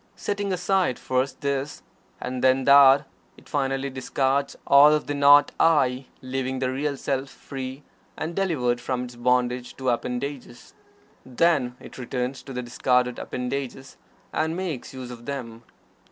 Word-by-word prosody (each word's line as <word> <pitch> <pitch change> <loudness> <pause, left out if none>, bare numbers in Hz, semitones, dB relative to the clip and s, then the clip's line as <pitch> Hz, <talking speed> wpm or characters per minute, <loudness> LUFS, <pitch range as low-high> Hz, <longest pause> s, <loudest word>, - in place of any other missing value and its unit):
Setting 205 -1 -3
aside 180 -4 +1
first 130 +1 -2
this, 140 +1 -3 0.4
and 125 0 -4
then 130 0 +4
that, 140 +1 +7 0.3
it - - -18
finally 135 -1 -1
discards 135 +1 -1
all 145 +2 +7
of 150 - -2
the 145 - -3
"Not 145 0 +6
I," 130 -5 +3 0.2
leaving 130 0 -3
the 130 0 -1
Real 140 +1 -2
Self 135 0 -2
free 135 +1 -8 0.3
and 165 +2 -4
delivered 125 -11 0
from 125 0 -2
its 125 -1 -9
bondage 125 0 0
to 130 -1 -1
its - - +4
appendages. 125 +1 -5 0.5
Then 130 -2 +1
it - - -12
returns 125 +1 -3
to 135 - -11
the 125 -1 -4
discarded 125 +1 +1
appendages, 130 +1 -5 0.4
and 160 +1 0
makes 175 -9 -4
use 130 -2 -8
of 120 -1 -11
them. 115 -5 -6
135 Hz, 150 wpm, -25 LUFS, 125-140 Hz, 0.5 s, that